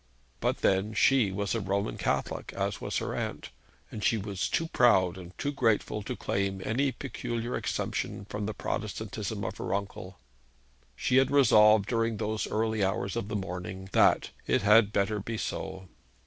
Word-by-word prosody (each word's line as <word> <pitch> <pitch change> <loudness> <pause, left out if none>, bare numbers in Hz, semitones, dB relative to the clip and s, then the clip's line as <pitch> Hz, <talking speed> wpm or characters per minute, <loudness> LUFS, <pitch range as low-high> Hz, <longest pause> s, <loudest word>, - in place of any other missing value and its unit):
But - - -1
then 100 +3 +1
she 130 -8 +4
was 100 +1 -2
a 115 - 0
Roman 100 +1 -1
Catholic, - - -2
as - - -2
was - - -2
her - - -2
aunt; - - -4 0.4
and 105 - -6
she 115 - +3
was 100 -2 -3
too 165 - 0
proud 95 - +4
and 90 -1 -11
too 145 - -1
grateful 115 -5 +1
to 100 - -5
claim 100 -1 -1
any 135 +5 +1
peculiar 120 -3 -4
exemption 100 - -3
from 105 0 -4
the 110 - -3
Protestantism - - -4
of - - -4
her - - -2
uncle. 100 -1 -6 0.8
She 125 - +1
had 135 0 +4
resolved 110 -7 +6
during 115 -1 0
those 110 +1 -2
early 110 -1 0
hours 95 +1 -1
of 115 -4 -2
the 105 - -4
morning 95 0 -5
that - - +4 0.2
'it - - +2
had 105 0 +6
better 105 +1 0
be 115 +3 -4
so.' 95 -2 -5
105 Hz, 170 wpm, -29 LUFS, 95-115 Hz, 0.8 s, resolved